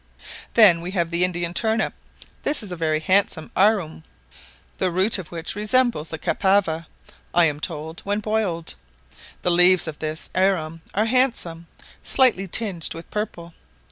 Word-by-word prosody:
Then 195 -7 +6
we 175 - -5
have 170 -1 0
the 170 +1 +1
Indian 175 -1 -1
turnip; 220 +2 0 0.5
this 290 -5 0
is 200 - -4
a - - -3
very 155 -2 0
handsome 185 -2 +1
arum, 190 -6 +1 0.8
the 185 - +1
root 190 +4 +3
of 175 - -9
which 165 -2 -5
resembles 210 -6 0
the 160 - -5
cassava, 175 -3 0 0.5
I 175 -1 +5
am 150 -2 -1
told, 160 +1 -6
when 205 +1 -1
boiled: 210 -6 -2 0.7
the 180 - +2
leaves 180 0 +5
of 155 -2 -7
this 155 +1 -5
arum 165 -4 0
are 210 +3 +2
handsome, 225 -9 0 0.3
slightly 240 -8 +2
tinged 185 -5 -2
with 165 - -10
purple. 170 -5 -5
180 Hz, 150 wpm, -22 LUFS, 165-210 Hz, 0.8 s, Then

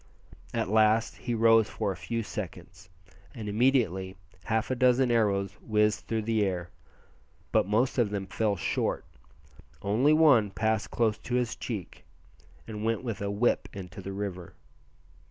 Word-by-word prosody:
At - - -1
last 110 +1 +3
he 120 -2 -3
rose 115 -1 +5
for 105 -2 -2
a - - -5
few 90 +7 -3
seconds, - - -8 0.5
and 110 -2 -6
immediately 105 -5 +1 0.3
half 110 +2 0
a - - +1
dozen 125 0 +3
arrows 100 -4 +2
whizzed 105 -1 +1
through 110 -1 -1
the 110 -1 +1
air; 90 -3 -2 0.8
but - - +3
most 120 +5 +1
of 115 -4 +3
them 100 -1 -3
fell 105 +2 0
short 85 - -1 0.8
only 115 +9 +3
one 145 -9 +5
passed 110 +2 -1
close 110 -2 0
to 120 - -3
his 125 -2 0
cheek, 105 -8 -6 0.6
and 105 -1 -6
went 115 +2 0
with 115 -6 -4
a 100 - -2
"whip" 105 +4 +1
into 95 0 -8
the 95 - -6
river. 95 -3 -5
110 Hz, 155 wpm, -28 LUFS, 100-115 Hz, 0.8 s, rose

